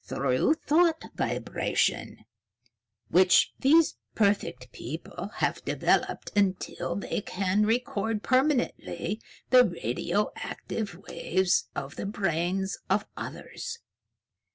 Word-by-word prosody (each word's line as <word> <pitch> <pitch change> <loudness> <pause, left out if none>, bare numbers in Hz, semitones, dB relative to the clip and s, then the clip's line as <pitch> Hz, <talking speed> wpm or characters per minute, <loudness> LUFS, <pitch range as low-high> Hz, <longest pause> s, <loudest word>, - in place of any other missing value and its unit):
"Through 135 - +1
thought 325 +1 +2
vibration, - - -1 0.8
which 185 0 +5
these 315 +4 +4 0.2
perfect 200 - 0
people 160 - -6
have - - -1
developed - - 0
until 195 -2 0
they 200 - -2
can 195 +2 0
record 225 -2 0
permanently 255 - 0 0.3
the 255 -1 +9
radioactive 200 - -2
waves 185 +1 +1
of 140 0 -5
the - - -3
brains 190 -1 -1
of - - +2
others." 465 -1 -6
200 Hz, 90 wpm, -28 LUFS, 180-245 Hz, 0.8 s, the